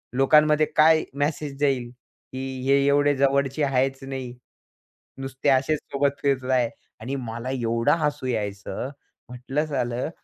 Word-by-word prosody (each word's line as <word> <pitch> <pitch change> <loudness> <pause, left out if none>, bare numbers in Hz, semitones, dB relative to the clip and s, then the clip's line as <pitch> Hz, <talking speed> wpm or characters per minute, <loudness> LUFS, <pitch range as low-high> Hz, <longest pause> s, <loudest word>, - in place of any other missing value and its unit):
लोकांमध्ये 150 +3 +4
काय 155 +1 +5
मेसेज 145 0 -2
जाईल, 130 -4 +1
की 130 +1 -9
हे 135 +1 +4
एवढे 145 0 +3
जवळचे 140 +1 +1
आहेच 135 -1 +1
नाही. 130 -2 -6 0.9
नुसते 135 +1 -2
असेच 140 +3 +2
सोबत 140 0 +2
फिरतायत 130 -3 +1 0.3
आणि 130 +5 -4
मला 120 -1 -5
एवढं 115 -1 +1
हसू 150 -3 -1
यायचं. 105 +1 -3 0.4
म्हटलं, 130 +5 -3
सालं, 125 -3 -2
135 Hz, 125 wpm, -24 LUFS, 125-145 Hz, 0.9 s, काय